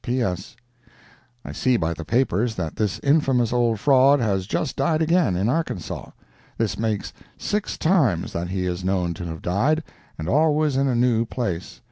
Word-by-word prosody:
P.S. 120 -5 -2 0.9
I - - -6
see 130 -2 +1
by 85 -3 -1
the 85 - -7
papers 115 - +1
that 80 -4 -4
this 105 -3 0
infamous 135 -5 +2
old 120 -3 +1
fraud 140 +3 +5
has 100 -5 0
just 130 - -2
died 160 -2 +1
again, 160 - +2
in 95 +4 0
Arkansas. 125 - -3 0.5
This 115 -2 0
makes 110 -2 -2 0.2
six 210 0 -2
times 140 - +1
that 85 +1 -3
he 95 0 -2
is 90 0 -3
known 90 -2 0
to 85 +1 -7
have 80 -2 -7
died, 135 - +1 0.3
and 80 - -5
always 150 - +2
in 135 +1 +2
a 130 - +1
new 120 -1 +3
place. 105 -8 -4
115 Hz, 170 wpm, -23 LUFS, 90-135 Hz, 0.9 s, fraud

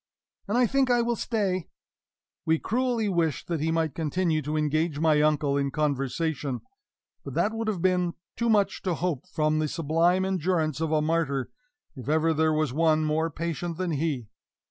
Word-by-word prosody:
"and 210 +4 0
I 250 - +5
think 270 +2 +2
I 240 -1 +3
will 235 0 0
stay." 200 -6 -1 0.8
We 160 0 +2
cruelly 235 +2 0
wished 170 -6 0
that 170 -2 -1
he 160 +2 0
might 160 -3 0
continue 160 +1 0
to 150 +1 -2
engage 155 +1 0
my 155 -2 +4
uncle 150 -2 +2
in 140 -1 0
conversation; 140 -1 -1 0.6
but - - -7
that 215 - +1
would 225 0 -3
have 190 -5 -2
been 180 -2 +2 0.2
too 235 0 0
much 205 -3 +2
to 180 -3 -1
hope 170 -2 -2
from 155 -3 0
the 155 - +1
sublime 165 +4 +1
endurance 170 -5 0
of 160 -1 0
a 155 -1 +2
martyr 155 -5 0 0.4
if 130 0 -7
ever 160 +1 +3
there 160 0 +2
was 155 -4 0
one 155 0 +3
more 160 +2 +1
patient 165 +1 -4
than 180 -1 -1
he. 145 -5 -1
160 Hz, 180 wpm, -27 LUFS, 155-185 Hz, 0.8 s, I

